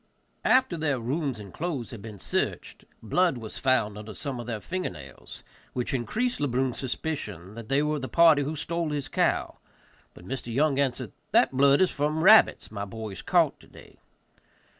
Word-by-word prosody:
After 255 -9 +3
their 145 -5 0
rooms 135 +1 -2
and 100 -3 -10
clothes 150 -8 -4
had 115 -4 -8
been 110 -1 -9
searched, - - -3 0.2
blood 170 - +2
was 110 -2 -7
found 110 -6 +1
under 105 0 -9
some 140 -4 -5
of 120 - -7
their 115 -3 -3
finger 185 - -3
nails, 70 -7 -11 0.3
which 125 +1 -2
increased 225 - -1
Le 145 - +2
Brun's 130 0 -1
suspicion 115 - -4
that 115 -1 -9
they 140 +2 +2
were 150 0 0
of - - -6
the 130 - -5
party 165 -3 +6
who 150 +3 -2
stole 170 +2 -2
his 145 -2 -3
cow; - - 0 0.6
but 90 - -13
Mr. 130 -2 -5
Young 140 +3 +2
answered, 135 -3 -1 0.2
"that - - +5
blood 140 +3 +4
is 185 - +4
from 150 +2 -1
rabbits 215 - +6
my 100 -2 -4
boys 105 -1 -6
caught - - +2
today." - - -17
135 Hz, 180 wpm, -27 LUFS, 115-155 Hz, 0.6 s, party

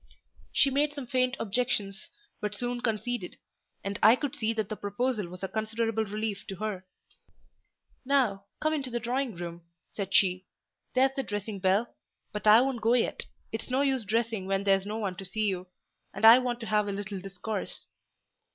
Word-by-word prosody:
She 275 - +4
made 290 +2 +2
some 280 -3 -5
faint 255 +1 +1
objections, 205 -3 -1 0.3
but 210 0 -3
soon 245 +2 -3
conceded; 225 -3 -2 0.5
and 200 +1 -3
I 220 +3 +8
could 285 +1 -3
see 225 -5 0
that 220 -3 -1
the 215 - -4
proposal 210 0 -1
was 180 +2 -10
a - - 0
considerable 220 +1 -1
relief 210 0 -3
to 195 - -5
her. 190 -2 -4 1.2
"Now, 250 -8 +2
come 310 +1 +1
into 280 -4 -2
the 240 0 -2
drawing 245 0 -1
room," 170 0 -6 0.3
said 195 -2 -4
she. 190 -3 +3 0.5
"There's 265 +1 +5
the 275 - 0
dressing 205 -3 -4
bell; 195 +5 +2 0.4
but 210 0 -3
I 215 +3 +9
won't 260 -3 -1
go 230 +2 +4
yet: 245 - 0 0.3
it's 225 - -5
no 260 +2 +2
use 265 -4 +1
dressing 220 -2 -1
when 195 0 0
there's 195 0 +3
no 215 +1 -3
one 200 -4 -2
to 195 - -6
see 215 +3 -1
you; 185 -2 -2 0.5
and - - +2
I 230 +3 +11
want 245 -2 -2
to - - -4
have 210 -1 +2
a - - -1
little 200 0 -4
discourse." 195 +2 -4
220 Hz, 185 wpm, -29 LUFS, 195-245 Hz, 1.2 s, I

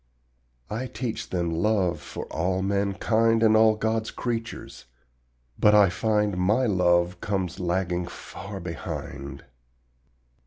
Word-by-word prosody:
I 120 +5 -3
teach 120 -2 -4
them 85 -2 -1
LOVE 95 0 +1
for - - -7
all 90 +3 0
mankind 105 +3 +2
And 110 -1 +5
all 110 0 +5
God's 110 0 -1
creatures, 115 -2 -5 0.7
but 105 0 +6
I 100 -2 +6
find 105 0 0
My 105 +8 +2
love 90 -3 +2
comes 95 -4 -2
lagging 90 0 -1
far 100 +3 -8
behind. 70 -5 -6
100 Hz, 115 wpm, -26 LUFS, 90-110 Hz, 0.7 s, but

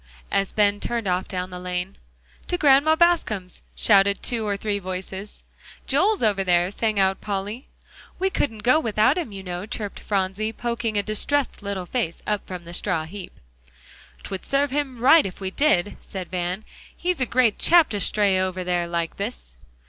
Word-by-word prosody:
as 195 -1 +1
Ben 205 -1 +2
turned 230 -2 -2
off 180 0 0
down 185 -1 -4
the 180 - -6
lane. 180 +1 -3 0.5
"To 355 - 0
Grandma 295 +1 +5
Bascom's," 315 - +1
shouted 200 -1 +4
two 230 -4 -1
or 200 -1 0
three 205 0 -2
voices. 190 +2 -7 0.4
"Joel's 385 - +2
over 205 -3 +2
there," 175 0 +2
sang 215 -1 0
out 190 0 +2
Polly. 205 +5 -4 0.5
"We 380 +1 0
couldn't 225 - -2
go 255 +6 +5
without 225 +1 +2
him, 310 -11 -4
you 195 -1 -8
know," 180 +2 -5
chirped 215 -3 -4
Phronsie, 200 +2 -1
poking 235 -2 -2
a 205 - +1
distressed 250 +7 -1
little 200 -2 -4
face 195 -5 -3
up 210 -1 0
from 180 -2 -6
the 170 - -9
straw 180 -3 -1
heap. 190 +3 -9 0.8
"'Twould 190 - -5
serve 280 0 +1
him 280 -2 -1
just 230 - -12
right 315 +5 +7
if 185 - -10
we 190 -1 -3
did," 205 -8 +2
said 185 -2 -7
Van. 180 +3 -2 0.3
"He's 355 -4 -1
a 255 - +1
great 240 -4 +2
chap 340 -2 +5
to 205 - -2
stay 200 -1 +2
over 185 0 -2
there 175 -1 0
like 170 -1 -2
this." 200 - -5
205 Hz, 180 wpm, -24 LUFS, 185-245 Hz, 0.8 s, right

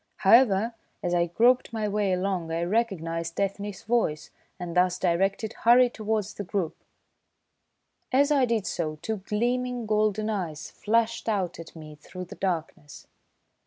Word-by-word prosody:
However, 225 +1 +4 0.3
as 175 - 0
I 175 0 +2
groped 240 +10 +3
my 220 -2 -2
way 205 -1 0
along, 180 -2 -1
I 165 +1 -1
recognised 170 -5 -1
Ethne's 200 0 -3
voice, 220 -10 0 0.3
and 175 -1 -5
thus 180 0 +3
directed, 195 +5 0
hurried 245 +1 +5
towards 215 -1 -2
the 205 - -5
group. 185 -3 -2 1.4
As 280 +3 +3
I 275 -3 +4
did 230 -4 0
so 155 -2 -2
two 220 +4 -2
gleaming, 240 +4 -1
golden 215 0 +1
eyes 165 -8 -4
flashed 230 +1 0
out 190 -6 -1
at 165 - -10
me 155 -1 -10
through 180 +5 -9
the - - -11
darkness. 165 -5 -4
200 Hz, 145 wpm, -26 LUFS, 175-225 Hz, 1.4 s, hurried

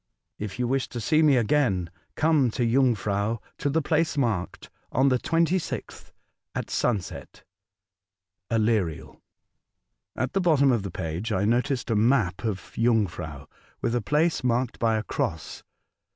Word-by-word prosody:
If 105 -2 -5
you 125 -1 0
wish 135 +1 0
to 120 - -5
see 155 +8 +2
me 145 -4 +5
again, 105 - +1 0.2
come 155 -5 +3
to 120 - +2
Jungfrau, 115 -4 +1 0.2
to 145 - 0
the 160 +2 +1
place 160 +1 +1
marked, 110 -10 -2 0.2
on 135 +2 +3
the 125 -1 +2
26th, 165 +4 -1 0.4
at - - -4
sunset. 105 -7 -2 1.1
Aleriel. 110 -8 0 0.9
At 130 - -2
the 195 - +1
bottom 145 -6 +4
of 120 -4 +1
the 100 - -5
page 90 +5 -4
I 100 -1 +1
noticed 120 +2 0
a - - +2
map 105 -5 +2
of 105 -5 -4
Jungfrau 95 -11 0 0.4
with 115 - 0
a 120 - +1
place 150 +8 +1
marked 125 0 0
by 115 -1 +2
a 110 - -2
cross. 80 -6 -3
120 Hz, 145 wpm, -26 LUFS, 100-135 Hz, 1.1 s, me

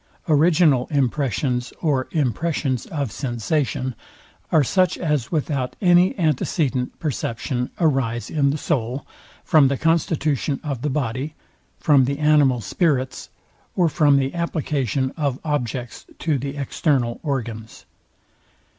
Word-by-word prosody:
Original 155 -4 +4
impressions 130 -3 0
or 140 -5 0
impressions 140 -2 -1
of 140 -7 -3
sensation 130 +1 -2 0.6
are 155 - +5
such 185 +7 +2
as 150 -8 -1
without 140 -5 -1
any 180 -1 +4
antecedent 145 -5 0
perception 125 -3 -2
arise 130 - +1
in 140 -3 +2
the 145 - -1
soul, 130 -3 -2 0.4
from 150 -4 +5
the 135 0 0
constitution 155 -3 0
of 140 -6 -4
the 150 - -1
body, 135 +2 -2 0.4
from 140 -4 +4
the 140 +2 -2
animal 145 -5 +3
spirits, 135 - -1 0.5
or 175 -2 +3
from 145 -2 +4
the 135 0 0
application 140 - -1
of 140 -4 -1
objects 125 -5 -3
to 150 -4 0
the 140 +2 -5
external 135 -3 0
organs. 115 -7 -4
140 Hz, 120 wpm, -22 LUFS, 125-155 Hz, 0.6 s, are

